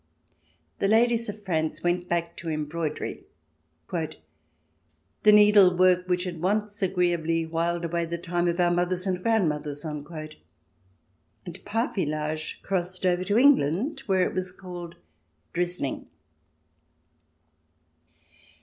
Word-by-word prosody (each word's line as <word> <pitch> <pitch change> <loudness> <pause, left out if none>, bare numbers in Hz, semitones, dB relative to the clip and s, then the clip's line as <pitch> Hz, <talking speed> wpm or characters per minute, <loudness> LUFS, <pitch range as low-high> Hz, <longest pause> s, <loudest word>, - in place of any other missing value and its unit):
The 195 - +2
ladies 230 +1 +3
of 205 0 -8
France 160 -3 -1
went 175 0 0
back 170 0 -1
to 170 -3 -5
embroidery, 155 0 -3 0.3
" 80 +1 -33
the 160 -3 -3 1.1
needlework 185 -3 +6
which 180 0 +1
had 175 -3 -5
once 205 +2 -1
agreeably 175 -3 +1
whiled 170 +1 -1
away 170 0 -1
the 170 +1 -4
time 175 0 -1
of 170 +1 -1
our 175 -1 +3
mothers 180 +1 0
and 185 -2 -1
grandmothers," 150 -9 0
and 155 0 -7 1.2
parfilage 155 - -2
crossed 185 0 -2
over 180 0 +2
to 205 +2 +1
England, 260 - +3
where 190 -2 +3
it - - -6
was 185 0 -3
called 175 -2 -9 0.3
" 80 0 -45
drizzhng." 175 -6 -2
175 Hz, 115 wpm, -26 LUFS, 160-185 Hz, 1.2 s, needlework